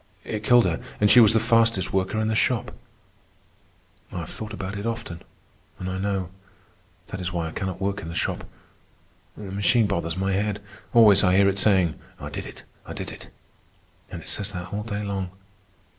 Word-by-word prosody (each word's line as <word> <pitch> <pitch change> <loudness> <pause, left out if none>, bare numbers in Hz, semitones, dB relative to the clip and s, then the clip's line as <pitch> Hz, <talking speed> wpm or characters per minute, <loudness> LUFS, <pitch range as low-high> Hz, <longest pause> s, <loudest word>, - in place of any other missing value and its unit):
It 105 -1 -4
killed 120 -1 +6
her, 85 -2 -1 0.2
and 105 0 +5
she 125 - +9
was 115 -2 +8
the 110 - +4
fastest 115 -5 +2
worker 95 +2 0
in 110 - 0
the 110 - +1
shop. 115 +2 +1 1.4
I - - -6
have 80 - -8
thought 110 -1 -6
about 100 -2 -5
it 100 +3 -3
often, 100 -7 -5 0.6
and 90 - -5
I 95 0 -3
know. 95 -2 -2 0.8
That 95 - -5
is 90 0 -3
why 85 -2 -2
I - - -6
cannot 95 -1 -4
work 100 +1 -2
in - - -7
the 85 - -6
shop. - - -1 0.9
The 100 -2 -7
machine 105 +4 +3
bothers 85 -4 -2
my 95 +1 0
head. 100 +1 0 0.3
Always 110 -5 +7
I 90 -1 +4
hear 100 0 +5
it 100 0 +2
saying, 95 -6 +3 0.2
'I - - -6
did - - -5
it, - - -12 0.2
I - - -8
did - - -6
it.' - - -11 0.8
And - - -7
it - - -5
says 100 0 -1
that 90 +1 -6
all 105 - -2
day 105 -1 -4
long. 100 -2 -3
100 Hz, 200 wpm, -25 LUFS, 95-105 Hz, 1.4 s, she